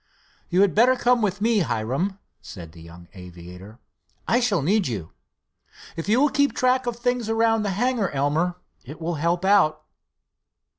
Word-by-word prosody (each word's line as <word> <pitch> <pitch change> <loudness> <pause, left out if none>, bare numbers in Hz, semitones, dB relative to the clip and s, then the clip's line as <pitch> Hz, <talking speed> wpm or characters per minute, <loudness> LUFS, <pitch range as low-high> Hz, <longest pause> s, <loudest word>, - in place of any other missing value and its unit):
"You 180 +2 +2
had 200 -2 +3
better 245 +4 +4
come 245 -1 +2
with 200 -2 -1
me, 225 0 +2
Hiram," 145 - -2 0.2
said 85 -7 -11
the 85 0 -15
young 85 +1 -14
aviator; 90 +2 -12 0.5
"I 240 - +3
shall 220 - 0
need 195 +4 +1
you. 100 -9 -5 0.8
If 165 +4 -5
you 225 +4 +3
will 295 +2 +3
keep 285 0 +1
track 255 0 +1
of 240 - -2
things 245 -1 -2
around 225 0 +2
the 205 - -2
hangar, 240 -4 0
Elmer, 150 +6 -1 0.3
it 145 +5 -11
will 170 +1 -3
help 170 +3 0
out." 155 -6 +3
190 Hz, 165 wpm, -23 LUFS, -, 0.8 s, better